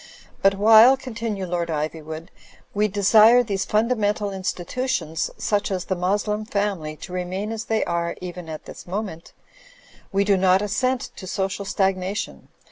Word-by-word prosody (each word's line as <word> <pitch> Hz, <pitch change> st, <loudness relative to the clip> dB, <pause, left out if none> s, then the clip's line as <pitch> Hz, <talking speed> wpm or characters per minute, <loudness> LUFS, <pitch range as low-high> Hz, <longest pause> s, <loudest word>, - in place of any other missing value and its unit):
'* -, -, -28 dB
"But 195 Hz, 0 st, +4 dB
while,*' 220 Hz, +5 st, +7 dB
continued 225 Hz, -7 st, -4 dB
Lord 170 Hz, -1 st, -1 dB
Ivywood, 155 Hz, +2 st, -4 dB, 0.4 s
"we 210 Hz, +1 st, +2 dB
desire 215 Hz, +4 st, +6 dB
these 200 Hz, -4 st, -2 dB
fundamental 210 Hz, -2 st, +1 dB
institutions, 185 Hz, -1 st, -2 dB
such 205 Hz, -1 st, 0 dB
as 185 Hz, -2 st, -2 dB
the 190 Hz, -, -1 dB
Moslem 205 Hz, +4 st, 0 dB
family, 200 Hz, -8 st, -2 dB
to 180 Hz, -, -10 dB
remain 185 Hz, +4 st, -3 dB
as 225 Hz, 0 st, -4 dB
they 220 Hz, -1 st, +1 dB
are 170 Hz, 0 st, -2 dB
even 180 Hz, -2 st, -7 dB
at 155 Hz, -1 st, -7 dB
this -, -, -11 dB
moment, 190 Hz, -3 st, -5 dB, 0.8 s
wie 195 Hz, +1 st, +2 dB
do 200 Hz, -1 st, +3 dB
not 185 Hz, +1 st, +3 dB
assent 255 Hz, +5 st, -1 dB
to 185 Hz, -, -8 dB
social 195 Hz, +1 st, -2 dB
stagnation. 190 Hz, 0 st, -2 dB
195 Hz, 150 wpm, -23 LUFS, 180-215 Hz, 0.8 s, while